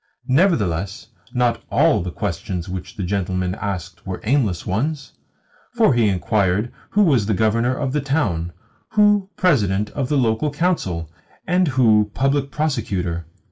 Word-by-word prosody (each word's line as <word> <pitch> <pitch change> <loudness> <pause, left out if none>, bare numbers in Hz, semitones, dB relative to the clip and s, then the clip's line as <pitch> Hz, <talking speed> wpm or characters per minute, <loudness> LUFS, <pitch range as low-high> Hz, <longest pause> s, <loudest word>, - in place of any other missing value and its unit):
Nevertheless 105 - +1 0.2
not 120 -2 +1
ALL - - +3
the 90 - -4
questions 90 -1 -4
which 90 -1 -6
the 100 - -4
gentleman 90 -1 -1
asked 95 -5 -5
were - - -4
aimless 110 - +1
ones, 135 +8 -2 0.6
for 225 - +4
he 115 -3 +3
inquired 100 +2 0 0.2
who 210 - +3
was 135 - +3
Governor 110 +4 +1
of 135 -2 -2
the 150 - +1
town, 105 - -1 0.4
who 205 -2 +4
President 105 - +2
of 135 -3 -3
the 145 - +2
Local 120 +3 +1
Council, 145 - -1 0.4
and 180 -1 +2
who 110 -6 +3
Public 135 +2 +1
Prosecutor. 100 - -2
115 Hz, 140 wpm, -21 LUFS, 95-145 Hz, 0.6 s, for